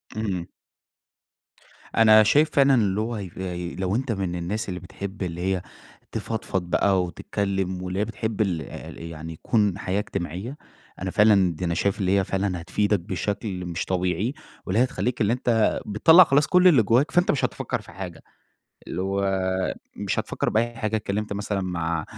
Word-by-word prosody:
امم. 100 -6 -2 1.5
أنا 110 -1 +8
شايف 150 +9 +4
فعلًا 140 -1 +5
اللي 105 -3 +1
هو 115 +2 -2
هيف 95 -5 -6 0.5
لو 95 +1 0
أنت 130 +1 -1
من 95 -4 -2
الناس 95 +5 -3
اللي 90 -1 -4
بتحب 95 +2 -7
اللي 85 -1 -4
هي 95 0 0 0.5
تفضفض 105 -4 -3
بقى 95 0 +3
وتتكلّم 95 +1 -2
واللي 90 +1 -3
هي 105 - +1
بتحب 110 0 -3
الع 90 -6 0 0.4
يعني 80 -1 -7
يكُون 100 +3 +1
حياة 95 +1 -1
إجتماعيّة، 100 - -5 0.4
أنا 95 0 -2
فعلًا 100 -4 +4
دي 90 - -4
أنا 85 - 0
شايف 95 +3 0
اللي 95 0 +2
هي - - +1
فعلًا 95 -2 -2
هتفيدك 105 +4 +1
بشكل 95 +1 -3
مش 85 -1 -3
طبيعي 95 +6 -1 0.3
واللي 95 +4 +1
هي - - +6
هتخلّيك 130 -2 -2
اللي 105 +1 +3
أنت 120 -3 +1
بتطلّع 160 - +7
خلاص 145 -2 +3
كلّ 180 +3 +5
اللي 140 -10 +6
جوّاك 125 +9 +2
فأنت 175 0 +3
مش 140 - +1
هتفكّر - - -3
في - - -14
حاجة، 90 -2 -8 0.7
اللي 90 - -3
هو 100 0 0 0.7
مش - - -2
هتفكّر - - -2
بأي 120 +2 +1
حاجة 110 -1 -1
اتكلّمت 105 0 -3
مثلًا 100 0 -2
مع 85 -3 -2
100 Hz, 170 wpm, -24 LUFS, 90-110 Hz, 1.5 s, أنا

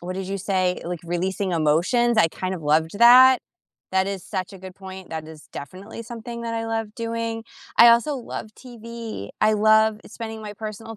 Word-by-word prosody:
what 180 +1 -5
did 190 0 -5
you 195 - -3
say? 185 -2 0
Like, 175 -1 -4
releasing 185 +3 -2
emotions? 175 +10 +2
I 165 - +5
kind 185 +3 -4
of 170 - -8
loved 160 +4 +1
that. 255 +2 +8 0.5
That 190 0 +2
is 195 -2 -5
such 185 0 -4
a - - -11
good 185 0 -10
point, 190 -1 -10
that 160 -1 -6
is 155 -1 -13
definitely 190 +11 -9
something 235 +1 -8
that 230 0 -3
I 225 0 -2
love 225 -1 -3
doing. 230 -1 -3 0.3
I 235 - +10
also 235 +5 +4
love 235 -3 -7
TV, 230 - -8
I 215 - +5
love 215 0 +4
spending 225 -1 -7
my 210 -1 -7
personal 220 +1 -7
210 Hz, 190 wpm, -23 LUFS, 185-230 Hz, 0.5 s, I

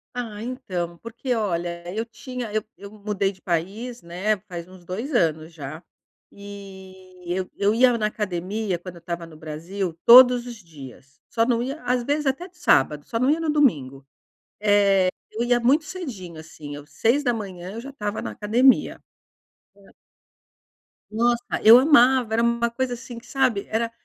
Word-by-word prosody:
Ah, 220 -4 -5
então, 180 -9 -4
porque 235 +4 -4
olha, 175 -5 -2
eu 225 +2 -2
tinha 245 0 -7
eu 215 -1 0
eu 200 +1 -11
mudei 205 -2 -2
de 185 - -20
país, 200 +8 -3
né, 185 +5 -1
faz 170 -1 -7
uns 185 -1 -15
2 225 - -5
anos 160 -5 0
já. 155 +2 -8 0.5
E, 190 -2 -12
eu 185 +1 -2
eu 205 +1 +2
ia 245 -1 +4
na 215 -1 +1
academia, 195 -1 -3
quando 180 0 -9
eu - - -12
estava 170 0 -5
no 160 -2 -14
Brasil, 165 +4 -5
todos 250 0 +8
os 240 - -7
dias. 140 - -14
Só 230 0 +1
não 235 -1 +1
ia 275 +5 -4
às 245 0 0
vezes 290 +3 -1
até 270 +7 -1
de 360 0 -26
sábado, 145 - +2
só 230 - -2
não 255 +3 +2
ia 315 +2 +2
no 325 -2 -2
domingo. 140 - +1 0.6
Eh, 200 -3 +4 0.2
eu 230 +2 -2
ia 240 0 +3
muito 285 +7 +3
cedinho, 220 - -7
assim, 150 -2 -10
eu 145 0 -11
6h 220 - -1
eu 230 - -6
já 275 +3 -9
estava 210 -5 -4
na - - -4
academia. 240 +5 +2 0.8
Ah 200 -1 -20 1.2
Nossa, 235 +2 +1 0.2
eu 225 +2 +10
amava! 260 -5 +4
Era 230 +1 +2
uma 235 0 +1
coisa 250 +1 -2
assim, 240 0 -9
que 235 - -12
sabe. 255 -6 0
Era, 230 +1 -1
210 Hz, 170 wpm, -23 LUFS, 180-245 Hz, 1.2 s, eu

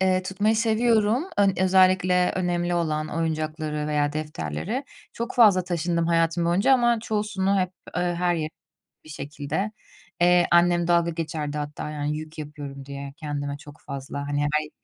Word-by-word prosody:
eee, 185 -1 +2
tutmayı 205 +4 +1
seviyorum, 225 +2 +2
ön 200 -1 +4
özellikle 185 -1 +4
önemli 175 -1 0
olan 155 -2 -1
oyuncakları 155 -2 -2
veya 150 -1 0
defterleri. 155 - -4 0.3
Çok 235 +1 -5
fazla 200 -7 +6
taşındım 170 -1 -1
hayatım 165 0 +2
boyunca 180 +10 +3
ama 240 -2 +3
çoğusunu 210 -3 0
hep, 185 -1 -1 0.3
eee, 180 - +1
her 175 0 +1
yere 155 -2 -2 0.5
bir - - -15
şekilde. 150 +7 -4 0.5
Eee, 175 0 +5
annem 175 0 +4
dalga 170 -1 +3
geçerdi 155 -2 -4
hatta 150 +1 -5
yani 150 0 -2
yük 155 +1 -9
yapıyorum 145 -2 -7
diye 140 0 -7
kendime 145 -2 -4
çok 145 +1 -14
fazla, 140 +1 -6
hani, 145 0 0
her 150 +1 +1
yere 150 - -10
170 Hz, 155 wpm, -25 LUFS, 150-185 Hz, 0.5 s, fazla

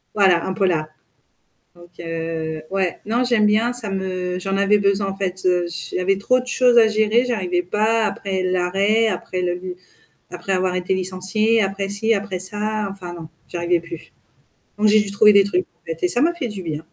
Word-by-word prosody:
voilà, 185 -5 +3
un 190 - -2
polar. 175 -5 0 0.9
Donc 175 0 -16
heu, 165 -1 -4
ouais, 190 -3 -1
non 235 +4 0
j'aime 240 -4 +3
bien, 220 +4 +2
ça 230 -4 +1
me 185 -1 -3
j'en 195 +1 -2
avais 200 +1 +3
besoin 200 0 +1
en 195 - -5
fait, 190 -1 -2
heu, 180 -1 +2
j 165 -2 -5
j'avais 190 +1 +1
trop 255 +5 +2
de 250 - -8
choses 245 -1 +3
à 225 -2 +7
gérer, 220 +3 +2
j'arrivais 185 -7 -1
pas, 215 +4 +1
après 190 -3 -3
l'arrêt, 195 +5 +1
après 185 -2 -3
le 180 0 -3 0.6
après 180 +2 -4
avoir 185 -1 0
été 180 +1 -1
licenciée, 190 +5 +1
après 195 0 -2
ci, 220 +3 +1
après 200 -2 -3
ça, 210 +2 -3
enfin 180 -3 -8
non, 165 -2 -9 0.2
j'arrivais 175 0 0
plus. 165 -1 -10 0.7
Donc 210 +1 +3
j'ai 215 +1 +5
juste 200 -1 -1
trouver 210 +1 +6
des 200 - +6
trucs 185 -2 -1
en - - -40
fait 165 +1 -6
et - - +4
ça 240 +7 +2
m'a 335 +4 +3
fait 320 -8 -4
du 200 -4 -7
bien. 155 -2 -4
195 Hz, 200 wpm, -21 LUFS, 180-215 Hz, 0.9 s, à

